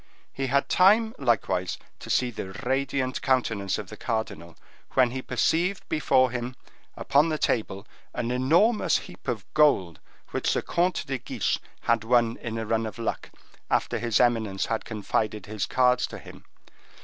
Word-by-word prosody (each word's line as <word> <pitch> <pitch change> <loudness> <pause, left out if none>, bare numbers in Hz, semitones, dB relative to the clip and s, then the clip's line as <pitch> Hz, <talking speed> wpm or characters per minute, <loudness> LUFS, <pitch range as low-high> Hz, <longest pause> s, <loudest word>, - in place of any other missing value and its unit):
He 135 0 -2
had 140 +2 +2
time, 220 +5 +4
likewise, 95 -8 0 0.2
to - - -10
see 125 -1 +2
the 95 -4 -6
radiant 130 0 -1
countenance 115 -7 0
of 100 -3 -7
the 110 - -8
cardinal, 100 -8 -4 0.4
when 130 -2 +4
he 130 +1 -4
perceived 170 - 0
before 130 -5 +3
him, 125 +1 -4 0.4
upon 145 +4 +3
the 155 - 0
table, 105 -7 -1 0.3
an 120 0 -3
enormous 165 - +3
heap 180 - -14
of 110 -6 -2
gold, 95 - +3 0.3
which - - 0
the - - 0
Comte 180 +2 0
de 135 -1 -3
Guiche 125 - -1 0.2
had 115 -1 +1
won 115 0 +2
in 115 -1 -5
a 115 - -3
run 110 +1 0
of 110 - -8
luck, 115 - -3 0.4
after - - 0
his 115 -2 +1
eminence 110 -5 +1
had 115 -1 -2
confided 105 -1 -2
his 105 -2 -3
cards 125 -1 +3
to - - -8
him. - - -13
120 Hz, 160 wpm, -26 LUFS, 110-135 Hz, 0.4 s, time